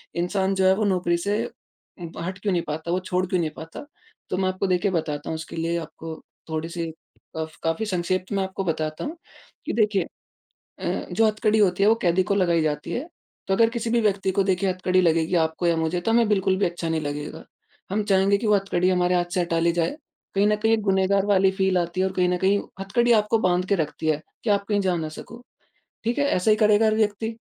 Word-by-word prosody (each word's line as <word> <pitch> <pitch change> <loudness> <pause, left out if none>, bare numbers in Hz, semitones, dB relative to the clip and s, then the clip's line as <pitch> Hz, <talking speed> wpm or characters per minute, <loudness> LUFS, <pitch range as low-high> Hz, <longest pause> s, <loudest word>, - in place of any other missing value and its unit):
इंसान 190 +2 0
जो 190 0 +2
है 190 - +6
वो 215 - -1
नौकरी 180 -3 +1
से, 200 +4 -1
उ 175 -3 -13
हट 185 +2 -4
क्यों 200 0 -1
नहीं 175 - +1
पाता, 160 +3 -4
वो 180 - +1
छोड़ 185 0 -1
क्यों 180 0 0
नहीं 165 -2 0
पाता। 160 - -9 0.4
तो 185 - -1
मैं 190 0 +1
आपको 185 +1 -2
देखिए 185 +2 +1
बताता 150 -4 -2
हूँ - - -2
उसके 160 +1 -7
लिए 165 +1 -1
आपको 160 0 -8 0.3
थोड़ी-सी, 165 +1 -3 0.5
कफ़ 160 -1 -5
काफ़ी 165 +7 0
संक्षेप 185 -1 -1
मैं 195 -1 0
आपको 190 +1 -4
बताता 155 -3 -2
हूँ। 310 - -4 0.5
कि - - -2
देखिए 210 -4 +2 0.8
अ, - - -2
जो 225 - +3
हथकड़ी 215 0 +1
होती 195 -2 +3
है 205 - +6
वो 225 - +5
कैदी 180 +1 +3
को 200 - 0
लगाई 175 -4 +2
जाती 150 -1 -2
है, 265 +7 -3 0.4
तो 195 - +1
अगर 225 +3 +4
किसी 230 -1 -3
भी 235 0 +2
व्यक्ति 200 -3 +1
को 195 +1 +1
देखिए 190 0 +1
हथकड़ी 185 0 +1
लगेगी 165 0 +2
आपको 160 +1 +1
या 170 - +3
मुझे, 160 +2 -1
तो 225 - 0
हमें 230 0 +4
बिल्कुल 190 -2 +2
भी 200 - +2
अच्छा 170 -1 -3
नहीं 160 -1 0
लगेगा। 145 0 -5 0.5
हम 210 +2 0
चाहेंगे 200 0 +3
कि 220 - -3
वो 210 - +5
हथकड़ी 185 -2 +1
हमारे 180 -1 +2
हाथ 175 0 +2
से 180 - +1
हटा 170 -1 0
ली 170 +1 +3
जाए, 170 - -1 0.4
कहीं 200 +1 +4
न 210 - +3
कहीं 220 +2 +2
एक 225 - +1
गुनहगार 195 0 +2
वाली 195 -2 +4
फील 190 -1 +1
आती 175 +1 0
और 190 - 0
कहीं 180 -1 +2
न 180 - +1
कहीं 195 +3 +2 0.2
हथकड़ी 235 +5 +1
आपको 215 0 +3
बाँध 180 -2 +1
के 200 - +4
रखती 160 -1 -3
है, 155 -1 +1 0.2
कि 230 - -1
आप 200 -1 +2
कहीं 205 -1 +2
जा 185 -2 +1
न 160 -2 -3
सको। 230 +9 -10 0.6
ठीक 235 +2 -1
है, 285 - +2
ऐसे 215 -6 +2
ही 215 - +4
करेगा 215 0 +4
हर 215 0 +3
व्यक्ति? 220 +1 -1
185 Hz, 235 wpm, -24 LUFS, 170-205 Hz, 0.8 s, है